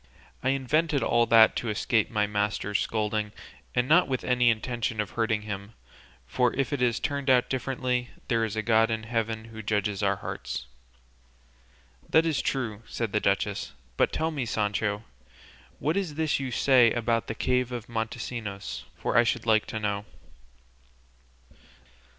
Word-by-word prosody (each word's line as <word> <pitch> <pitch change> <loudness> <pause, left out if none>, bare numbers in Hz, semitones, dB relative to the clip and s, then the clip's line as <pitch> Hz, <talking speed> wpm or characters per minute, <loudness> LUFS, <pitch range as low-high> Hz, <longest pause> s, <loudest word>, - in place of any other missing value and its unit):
I 130 - +1
invented 140 +3 +1
all 120 0 +3
that 115 0 +7
to 120 - -2
escape 110 +1 +1
my 105 -2 +1
master's 105 0 -1
scolding, 105 -1 -1 0.4
and 125 0 +2
not 175 +5 +5
with 130 -2 -2
any 125 -1 +3
intention 115 -1 -1
of 105 - -1
hurting 110 -2 0
him; 100 +1 -6 0.6
and 125 -2 +3
if 135 +2 -1
it 140 - -1
has 120 -2 +2
turned 140 -1 -2
out 125 -1 +4
differently, 125 -1 -1 0.2
there 115 -2 +1
is 110 -2 -2
a 110 - -1
God 115 0 +4
in 110 -1 -2
heaven 115 -1 -2
who 110 -1 -9
judges 105 -1 -1
our 100 -1 +2
hearts." 60 - -5 1.4
"That 160 +1 +4
is 160 -3 +1
true," 115 -6 -2
said 115 -3 -3
the 105 - +2
duchess; 100 -8 -1 0.2
"but - - +2
tell 160 +1 -1
me, 135 -6 -3
Sancho, 105 -1 -1 0.7
what 155 +5 0
is 185 -7 -2
this 155 -2 +1
you 135 -1 -3
say 125 -2 +5
about 115 -1 0
the 110 - -4
cave 125 0 0
of 120 -2 -5
Montesinos, 110 -3 -4
for - - -2
I 120 - +7
should 115 - -1
like 110 -1 +3
to 110 - -4
know." 100 -1 -2
115 Hz, 160 wpm, -27 LUFS, 105-125 Hz, 1.4 s, that